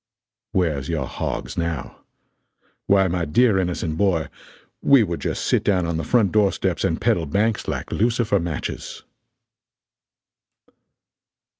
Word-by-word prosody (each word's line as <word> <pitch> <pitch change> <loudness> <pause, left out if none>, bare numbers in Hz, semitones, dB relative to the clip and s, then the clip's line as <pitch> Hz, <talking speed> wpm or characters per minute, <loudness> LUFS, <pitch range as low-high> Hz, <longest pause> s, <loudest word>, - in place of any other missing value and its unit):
] 115 0 -69
"Where's 80 -8 0
your 80 -5 -1
hogs - - -4
now? 85 -5 -3 0.9
Why 95 -1 +4
my 90 -1 -1
dear 100 +6 +3
innocent 85 -3 -2
boy, 90 -6 +1 0.5
we 135 -4 +6
would 85 -5 -3
just - - -3
sit - - +2
down 95 -4 +2
on 85 -1 -2
the 80 - -2
front 105 +1 +2
door 105 -2 +3
steps - - -2
and - - 0
peddle 80 -3 +1
banks 105 +8 0
like - - -4
lucifer 115 -2 +1
matches!" 85 -4 -5
90 Hz, 135 wpm, -22 LUFS, 80-105 Hz, 0.9 s, we